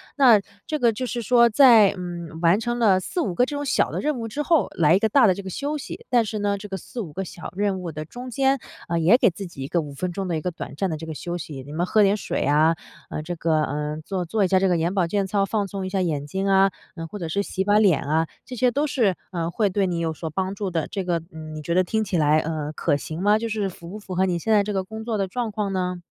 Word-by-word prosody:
那 245 -7 +6 0.2
这 305 - -2
个 235 -3 +4
就 240 +4 -4
是 240 -1 -3
说 235 +1 +5
在， 230 -4 +7
嗯， 170 -3 -7
完 175 +4 +4
成 240 +1 -2
了 200 -5 +4
4-5 195 - -2
个 250 - +4
这 290 - -5
种 285 - -3
小 280 - +1
的 - - -3
任 300 -2 -1
务 230 -1 -4
之 255 +7 -3
后， 325 0 +3
来 165 0 +4
一 - - +3
个 220 - +2
大 245 +2 +5
的 185 - +3
这 200 - -7
个 190 - -6
休 290 - -2
息。 285 - -8
但 240 -3 +3
是 215 0 -4
呢， 205 0 0
这 200 - -8
个 195 -1 -4
4-5 190 -3 -7
个 190 - -3
小 175 -1 -8
任 200 -1 0
务 175 -2 -5
的 155 0 -6
中 245 +9 -8
间， 270 +2 +2 0.3
呃， 170 0 +1
也 175 +9 +5
给 - - +5
自 195 +3 -7
己 170 -6 -10
一 - - -4
个 170 +3 0
5 145 -2 -8
分 180 +6 -3
钟 190 +2 -4
的 175 - -1
一 155 - -2
个 180 - -1
短 160 -4 -8
暂 190 +5 -1
的 160 - -3
这 160 - -7
个 160 - -5
休 175 +3 -4
息， 150 -5 -7
你 145 - -11
们 170 +3 0
喝 215 +3 +3
点 200 +1 +4
水 - - -3
呀， 155 +3 +3 0.4
呃， - - -3
这 175 +3 -5
个， 160 -1 +1
呃， 150 +2 -3
做 185 +1 -3
做 210 +5 0
一 - - +3
下 190 - +3
这 190 +1 +3
个 180 -2 +2
眼 170 +4 -1
保 185 -3 +3
健 195 +3 -1
操 195 +1 +1
放 205 0 -1
松 195 0 -5
一 - - -3
下 190 -1 0
眼 150 -5 -1
睛 190 +6 -2
啊， 195 0 +4 0.2
嗯， 165 -1 -6
或 205 +5 -8
者 165 -3 -4
是 200 +5 0
洗 190 -1 -2
把 205 +1 +3
脸 200 -8 +4
啊， 160 +3 0 0.2
这 255 - -7
些 250 +1 +2
都 285 +5 0
是， 225 -10 +1 0.2
呃， 170 -2 -2
会 205 +3 +1
对 195 +1 +1
你 175 -2 -1
有 165 -1 -1
所 160 +1 -6
帮 190 +4 -2
助 195 -2 -3
的。 165 -3 -1
这 195 -3 -3
个， 175 -2 0
嗯， 155 -1 -8
你 155 - -6
觉 170 +3 -2
得 185 - +4
听 220 +4 0
起 190 -3 -1
来， 155 0 +4
呃， 155 -1 -3
可 150 -1 +1
行 155 +3 -6
吗？ 205 +2 +4
就 230 +1 -3
是 215 -3 -1
符 170 -2 -11
不 210 +4 -7
符 190 -3 -7
合 190 +1 +3
你 175 -2 0
现 220 - -2
在 210 -2 +5
这 210 +1 -3
个 190 -1 0
工 220 +3 -8
作 225 -1 -2
的 195 -1 0
状 230 +3 -3
况 205 -2 -2
呢？ 180 -1 -1
190 Hz, 315 characters per minute, -24 LUFS, 165-215 Hz, 0.4 s, 在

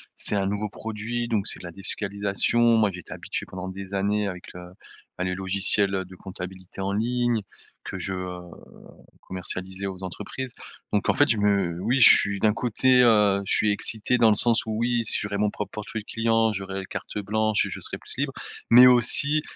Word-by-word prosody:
c'est - - +1
un 100 -1 0
nouveau 105 +1 -3
produit, 110 +3 -5
donc 110 -3 -1
c'est - - -3
la 85 - -7
défiscalisation. 100 +3 -1 0.2
Moi, 110 -2 +3
j'étais 90 -1 -9
habitué - - -5
pendant 95 0 -7
des 95 +1 -8
années 100 +1 0
avec 90 -2 -7
le, 90 0 -11 0.4
bah, 90 - -2
les 90 0 -2
logiciels, 95 +1 +1
heu, 95 0 -3
de 95 +1 -14
comptabilité 95 0 -9
en 100 +1 -2
ligne 120 +1 0 0.4
que - - -6
je, 95 +2 -3
heu, 90 -1 -6 0.8
commercialisais 95 +1 -5
aux 95 -1 -7
entreprises. 105 +7 -6 0.4
Donc 105 - 0
en - - +4
fait, 145 +1 +3
je 115 - +3
me 100 -4 0
oui 120 +7 +1
je 120 - +9
suis 100 0 +3
d'un 105 +1 +2
côté, 125 +2 +3
heu, 105 -4 +4
je - - 0
suis 105 - +2
excité 110 +4 +4
dans 115 -2 +5
le 105 - +3
sens 115 +1 +4
où 110 - -4
oui, 120 +1 0
si - - +1
j'aurai 105 0 -3
mon 105 +1 +1
propre 105 - -6
portefeuille 105 +1 -6
client, 115 0 +1
j'aurais 95 -1 -5
carte 105 - -6
blanche 110 +1 0
et - - -5
je - - -6
serai - - -3
plus - - -3
libre, - - -2 0.4
mais 125 +2 +9
aussi, 125 +5 +3
105 Hz, 200 wpm, -24 LUFS, 95-115 Hz, 0.8 s, je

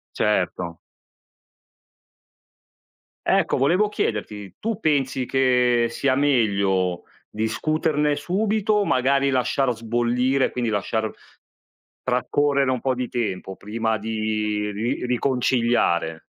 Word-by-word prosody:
Certo. 85 -1 -1 2.5
Ecco - - +2
volevo 180 +10 +3
chiederti, 105 - -3
tu 225 -2 -3
pensi 135 -4 0
che 125 -3 +3
sia 130 +2 +1
meglio 100 -10 +1 0.3
discuterne 150 +7 0
subito, 205 +6 0
magari 135 -3 +2
lasciar 130 0 +1
sbollire, 120 +4 +1
quindi 120 -2 -2
lasciar 110 +1 -1 1.0
trascorrere 140 +2 +1
un 125 -2 -1
po' 130 -1 0
di 125 0 -3
tempo 95 -5 -3
prima 110 +1 -2
di 110 -1 -2
ri 110 +5 -2
riconciliare? 120 -10 +1
125 Hz, 90 wpm, -23 LUFS, 110-140 Hz, 2.5 s, volevo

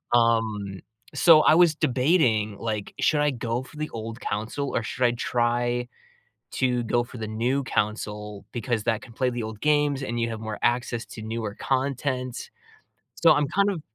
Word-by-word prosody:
Um, 110 -5 +1 0.3
so 165 -3 +7
I 155 - +5
was 170 -2 +6
debating, 125 - +2
like, 110 -3 -3
should 150 -1 +3
I 150 -1 +3
go 120 0 -3
for 140 - -14
the 155 +1 -3
old 115 +1 -6
console 110 +7 -3
or 115 - -1
should 130 - -3
I 120 - +4
try 120 0 0 0.7
to 125 -2 +1
go 120 +1 +1
for 120 - -11
the 110 -1 -4
new 120 +6 0
console 105 -3 -3
because 120 -2 -2
that 115 -1 0
can 125 -3 -13
play 130 +1 +1
the 120 -1 -3
old 110 -1 -7
games 145 -2 +2
and 120 -2 -3
you 115 - 0
have 110 -1 -5
more 110 -1 -5
access 120 -1 0
to 110 - -9
newer 110 -2 -4
content? 130 -1 -2 0.7
So, - - +5
I'm 145 -1 +1
kind 200 +6 +2
of 175 -6 -3
120 Hz, 180 wpm, -25 LUFS, 110-135 Hz, 0.7 s, so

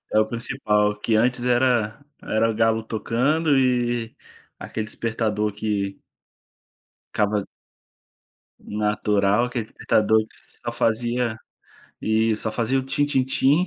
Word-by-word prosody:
É - - +6
o 110 - +2
principal, 105 -3 0
que 110 0 +1
antes 125 +2 +2
era 120 -3 +2 0.2
era 110 +1 +1
o 115 - 0
galo 110 0 +2
tocando 135 +7 +1
e 120 -3 +1 0.4
aquele 110 -1 -4
despertador 105 -1 -1
que 100 -2 -2 1.1
acaba 105 -1 +1 1.2
natural, 105 +1 +1
aquele 125 -3 -3
despertador 110 0 +2
que - - -12 0.3
só 120 - -1
fazia 120 0 0 0.6
e 110 0 +2
só 110 +1 -3
fazia 120 +4 0
o - - 0
tim 135 +2 0
tim 135 -3 +2
tim. 145 +7 +2
115 Hz, 125 wpm, -23 LUFS, 105-125 Hz, 1.2 s, É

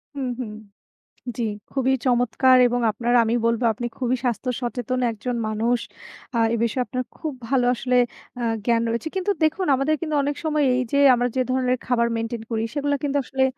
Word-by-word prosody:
হুম, 270 -2 -2
হুম, 235 -4 -4 0.9
জি। 240 - -2 0.3
খুবই 265 -1 +1
চমৎকার 250 +1 +4
এবং 245 0 0
আপনার 235 +3 -2
আমি 225 +1 0
বলব 230 -1 +1
আপনি 240 +3 -4
খুবই 255 0 +1
স্বাস্থ্য 250 +1 -1
সচেতন 250 +1 -2
একজন 235 +3 -4
মানুষ। 225 +3 +1 0.6
আ - - +2 0.2
এ - - +1
বিষয়ে 235 +2 0
আপনার 255 0 -3
খুব 310 -2 -3 0.2
ভালো 255 -2 +2
আসলে 250 +1 0 0.4
আ - - -2 0.2
জ্ঞান 230 -1 +3
রয়েছে। 235 +7 -2
কিন্তু 380 +2 0
দেখুন 320 +4 +1
আমাদের 275 +4 +1
কিন্তু 310 -2 -2
অনেক 285 +1 -1
সময় 305 -2 +1
এই 255 - +1
যে 280 - +3 0.2
আমরা 245 0 +1
যে - - +2
ধরনের 255 -1 +1
খাবার 235 -2 +2
মেইনটেইন 230 0 -3
করি 225 -1 -1
সেগুলা 285 -1 0
কিন্তু 285 -1 -1
আসলে 265 +1 0
250 Hz, 185 wpm, -23 LUFS, 235-275 Hz, 0.9 s, চমৎকার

